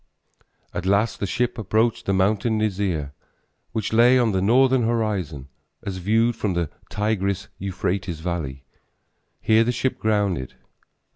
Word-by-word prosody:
At 95 - -3
last 100 +1 +2
the 100 - -1
ship 120 +4 -1
approached 110 +3 0
the - - +2
mountain 105 +4 +2
Nisir 95 -9 -1 0.6
which 110 -1 -3
lay 120 +3 +6
on 120 -3 +3
the 95 -1 0
northern 130 +5 +4
horizon, 105 - -1 0.4
as 100 -4 -4
viewed 110 +5 +2
from 105 -5 -2
the 85 -3 -1 0.2
Tigris 100 -2 -1
Euphrates 90 -2 -2
valley. 80 -6 -4 0.8
Here 110 +1 +4
the 120 - +1
ship 125 +2 -1
grounded. 100 - 0
100 Hz, 135 wpm, -23 LUFS, 90-115 Hz, 0.8 s, lay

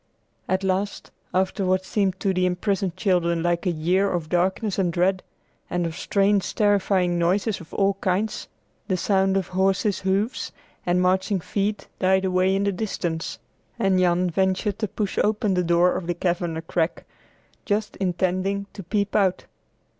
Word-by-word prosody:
At 185 +1 +1
last, 190 +1 -2 0.2
after 190 +2 0
what 185 0 +1
seemed 190 -3 0
to 195 -2 +1
the 185 0 +2
imprisoned 185 0 -1
children 170 -4 +1
like 175 +1 0
a - - +3
year 180 +5 +1
of 170 -3 -2
darkness 190 +4 0
and 180 -3 +2
dread, 185 +2 +1 0.5
and 175 -1 -1
of 165 -1 -4
strange, 200 +1 +1
terrifying 190 -4 +2
noises 195 +4 +1
of 165 - -14
all 200 0 +2
kinds, 195 +4 -1 0.4
the 185 - 0
sound 195 +1 +2
of 190 - -2
horses' 190 +2 +1
hoofs 195 +6 -1 0.4
and 180 +1 +3
marching 190 +2 +2
feet 205 +4 -2
died 190 0 +3
away 185 +1 +2
in 195 - +1
the 200 - +1
distance, 175 - -3 0.4
and 195 -5 +2
Jan 180 0 +2
ventured 190 +3 0
to 215 - 0
push 200 0 -3
open 210 -1 +1
the 180 -1 +1
door 175 +1 +3
of 170 - -4
the 175 - -1
cavern 175 -2 -1
a 165 - -5
crack, 165 0 -1 0.6
just 210 +1 -1
intending 185 +2 0
to 200 - -7
peep 200 +2 -1
out. 190 -3 +2
190 Hz, 165 wpm, -24 LUFS, 180-200 Hz, 0.6 s, a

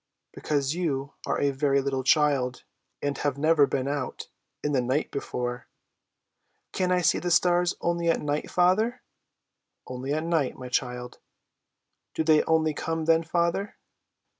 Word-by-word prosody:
"Because 145 -1 -1
you 145 -6 -2
are - - 0
a 140 - +2
very 140 0 +1
little 135 -1 -2
child, 135 -3 +2 0.4
and 145 0 0
have 145 -2 -1
never 155 -1 +4
been 130 0 -2
out 140 -2 -4 0.3
in 150 - 0
the 135 -3 +2
night 130 +5 -1
before." 125 -3 -4 1.0
"Can 185 -1 0
I 180 0 +3
see 165 -2 +3
the 175 - -2
stars 175 0 +3
only 170 0 0
at 165 - +2
night, 150 0 -2
father?" 210 +8 +2 0.8
"Only 130 +2 -5
at 155 +2 0
night, 165 -5 0
my 125 -1 -8
child!" 125 0 -3 1.0
"Do - - 0
they 155 -1 +5
only 160 -1 +2
come 160 +1 -3
then, 165 0 +4
father?" 170 +4 -1
150 Hz, 150 wpm, -26 LUFS, 135-170 Hz, 1.0 s, they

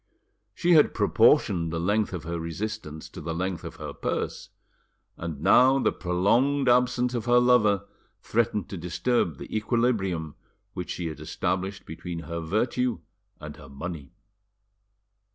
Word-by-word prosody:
She 175 - +1
had 155 -3 +5
proportioned 85 -4 +3
the 80 - -2
length 105 +5 +1
of 90 -4 -5
her 85 +1 -4
resistance 85 -1 -5
to - - -9
the 80 +1 -4
length 90 0 -3
of - - -7
her - - -7
purse, - - -3 0.7
and 80 -4 -6
now 130 +9 +6
the 135 - +2
prolonged 120 +11 +1
absence 125 0 +3
of 120 -2 -2
her 120 0 +4
lover 105 -5 +3 0.3
threatened 110 -4 0
to 95 - -5
disturb 85 - 0
the - - -8
equilibrium 105 - 0 0.4
which - - -5
she 90 - -4
had 80 -1 -5
established 95 +1 -3
between 85 +1 -6
her 85 0 -5
virtue 115 +8 -1 0.4
and - - -9
her - - -13
money. 75 +2 -7
95 Hz, 145 wpm, -26 LUFS, 85-120 Hz, 0.7 s, now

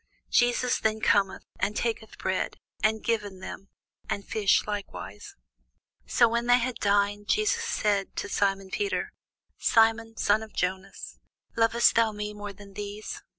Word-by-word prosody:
Jesus 245 0 +3
then 220 0 0
cometh, 195 -2 +2 0.2
and 205 +2 0
taketh 225 -2 -2
bread, 190 0 -2 0.2
and 215 +1 +1
giveth 205 -5 -1
them, 195 +1 -8 0.4
and 200 - -2
fish 205 -3 +2
likewise. 210 - -6 0.7
So 235 - +5
when 235 +1 -1
they 245 0 +7
had 250 0 -2
dined, 205 0 +1
Jesus 430 +2 +2
saith 210 - 0
to - - -3
Simon 195 -1 0
Peter, 400 - -2 0.5
Simon, 225 0 +3
son 210 +2 +3
of 220 -1 -10
Jonas, 190 +2 -3 0.4
lovest 230 +1 +4
thou 230 -1 +3
me 210 0 -4
more 205 -1 -6
than 200 0 -14
these? 205 +1 -6
210 Hz, 145 wpm, -27 LUFS, 200-230 Hz, 0.7 s, they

